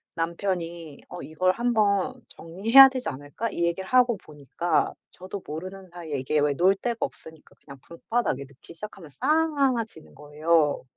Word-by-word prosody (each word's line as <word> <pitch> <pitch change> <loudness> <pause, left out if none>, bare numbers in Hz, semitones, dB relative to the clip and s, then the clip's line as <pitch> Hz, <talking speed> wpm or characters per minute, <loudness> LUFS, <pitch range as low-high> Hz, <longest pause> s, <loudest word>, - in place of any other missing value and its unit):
남편이 170 -2 -4
"어 180 - -8
이걸 180 +4 +1
한 240 +3 0
번 215 +3 +1
정리해야 220 +11 +6
되지 255 -1 -3
않을까?" 145 +12 -5
이 170 - -3
얘기를 180 +3 -3
하고 245 -3 +4
보니까 150 +2 -2 0.2
저도 190 +2 -8
모르는 185 +4 -8
사이에 165 -5 -5
이게 140 +4 0
왜 145 -1 +2
놓을 185 +6 +3
데가 235 +3 -3
없으니까 160 -1 -7
그냥 140 -1 -12
방바닥에 170 - -2
놓기 140 +5 -16
시작하면 180 -2 -10
쌓아지는 270 - 0
거예요. 150 +1 +1
175 Hz, 350 characters per minute, -25 LUFS, 155-225 Hz, 0.2 s, 정리해야